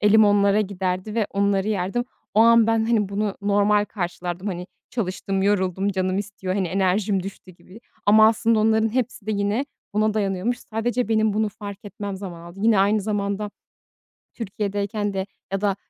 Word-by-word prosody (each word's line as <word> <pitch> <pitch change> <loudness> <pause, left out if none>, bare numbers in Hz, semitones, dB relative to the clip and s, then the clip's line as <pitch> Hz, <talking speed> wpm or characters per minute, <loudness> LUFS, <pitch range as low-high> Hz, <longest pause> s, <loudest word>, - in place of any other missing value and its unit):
elim 210 +1 +6
onlara 205 0 +4
giderdi 190 0 -2
ve 220 -3 +1
onları 200 0 +1
yerdim. 200 +4 -1 0.3
O 215 - +5
an 230 0 +6
ben, 225 -1 +2
hani, 215 -4 +2
bunu 200 0 -1
normal 205 +1 +3
karşılardım. 180 -1 -4
Hani, 180 -2 -4 0.2
çalıştım, 195 -3 -2
yoruldum, 195 -1 +1
canım 185 -1 0
istiyor, 195 -2 -4
hani, 190 -3 0
enerjim 195 +1 +1
düştü 195 0 -9
gibi 185 +4 -16 0.3
ama 215 +1 +7
aslında 225 0 +2
onların 220 +1 +3
hepsi 250 -4 -2
de - - -1
yine 205 +6 0 0.3
buna 215 0 +2
dayanıyormuş. 205 +4 0
Sadece 235 +2 -2
benim 220 -1 +2
bunu 215 +1 +1
fark 205 0 -9
etmem 200 -1 -6
zaman 185 -3 -7
aldı. 170 +3 -11
Yine 220 -2 +4
aynı 205 +2 +3
zamanda 205 0 -2 0.8
Türkiye'deyken 205 -1 -3
de 190 0 -2 0.3
ya 195 0 -1
da, 200 -2 +1
205 Hz, 165 wpm, -23 LUFS, 195-215 Hz, 0.8 s, ama